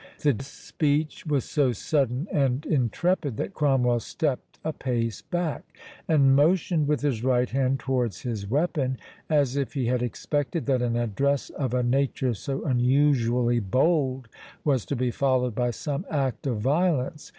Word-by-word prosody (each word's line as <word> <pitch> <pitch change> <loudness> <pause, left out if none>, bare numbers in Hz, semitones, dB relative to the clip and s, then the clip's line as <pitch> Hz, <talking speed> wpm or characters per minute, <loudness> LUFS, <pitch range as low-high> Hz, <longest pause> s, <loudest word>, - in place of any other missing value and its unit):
The 145 -4 +3
speech 150 +3 -2
was 145 -4 +1
so 140 -5 +1
sudden 135 - 0
and 135 0 +1
intrepid 145 - 0
that 195 - -3
Cromwell 130 -6 +2
stepped 145 +2 -3
a 160 - -1
pace 115 -5 -2
back, 175 -6 -4 0.3
and 140 -4 +5
motioned 160 +1 +2
with 150 -1 +1
his 130 -6 -1
right 125 -1 +2
hand 135 0 0
towards 125 -8 -1
his 110 -5 -4
weapon, 140 -2 0 0.3
as 145 -4 +2
if 140 +1 -2
he 130 -3 0
had 125 +1 +1
expected 145 +6 -2
that 130 -3 +1
an 120 -1 0
address 125 +5 0
of 130 -3 -2
a 125 - +1
nature 130 0 +1
so 135 +7 -4
unusually 125 -2 +2
bold 130 - +1 0.4
was 135 -7 +1
to 140 - -1
be 125 -1 0
followed 130 -2 +1
by 120 +2 0
some 145 +5 -3
act 135 -4 -1
of 115 -5 -1
violence. 150 - 0
135 Hz, 155 wpm, -26 LUFS, 125-145 Hz, 0.4 s, and